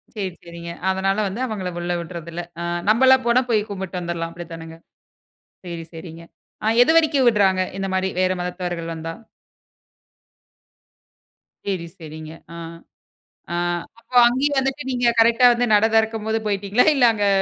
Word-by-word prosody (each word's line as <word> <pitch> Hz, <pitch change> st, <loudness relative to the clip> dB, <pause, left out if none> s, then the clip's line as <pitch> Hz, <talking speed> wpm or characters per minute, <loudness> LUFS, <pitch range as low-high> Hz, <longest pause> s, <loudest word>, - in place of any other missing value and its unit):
சேரி, 190 Hz, -4 st, -4 dB
சரிங்க. 170 Hz, 0 st, -8 dB, 0.2 s
அதனால 190 Hz, +1 st, 0 dB
வந்து, 195 Hz, +5 st, -5 dB
அவங்கள 200 Hz, -6 st, -4 dB
உள்ள 175 Hz, 0 st, -2 dB
விட்றதில்ல. 170 Hz, 0 st, -7 dB, 0.2 s
அ, -, -, -3 dB, 0.3 s
நம்மளாம் 260 Hz, +4 st, +6 dB
போனா, 240 Hz, +2 st, +4 dB
போய் 215 Hz, -2 st, +1 dB
கும்பிட்டு 190 Hz, -2 st, -5 dB
வந்துர்லாம். 170 Hz, -1 st, -4 dB
அப்பிடித்தானங்க. 165 Hz, -1 st, -9 dB, 0.9 s
சேரி, 170 Hz, -1 st, -6 dB
சரிங்க. 165 Hz, 0 st, -9 dB, 0.4 s
ஆ, -, -, 0 dB, 0.2 s
எது 320 Hz, -, +4 dB
வரைக்கும் 300 Hz, -5 st, +3 dB
விட்றாங்க. 195 Hz, -4 st, +3 dB, 0.2 s
இந்தமாரி, 190 Hz, -1 st, -1 dB
வேற 185 Hz, 0 st, +2 dB
மதத்தவர்கள் 175 Hz, -2 st, -4 dB
வந்தா? 165 Hz, 0 st, -6 dB, 2.5 s
சேரி. 185 Hz, -4 st, -2 dB
சேரிங்க. 155 Hz, -1 st, -9 dB, 0.2 s
ஆ, -, -, -9 dB, 1.0 s
ஆ -, -, -1 dB, 0.4 s
அப்ப 255 Hz, -, -24 dB
அங்கேயும் 270 Hz, +4 st, +1 dB
வந்துட்டு, 270 Hz, +2 st, -2 dB
நீங்க 245 Hz, -1 st, +1 dB
கரெக்ட்டா 235 Hz, +2 st, +6 dB
வந்து, 240 Hz, +1 st, 0 dB
நட 210 Hz, +1 st, +5 dB
திறக்கம்போது 220 Hz, 0 st, +1 dB
போயிட்டீங்களா? 200 Hz, +3 st, +1 dB
இல்ல, 255 Hz, -, +4 dB
அங்க 205 Hz, -2 st, 0 dB
190 Hz, 135 wpm, -22 LUFS, 170-225 Hz, 2.5 s, நம்மளாம்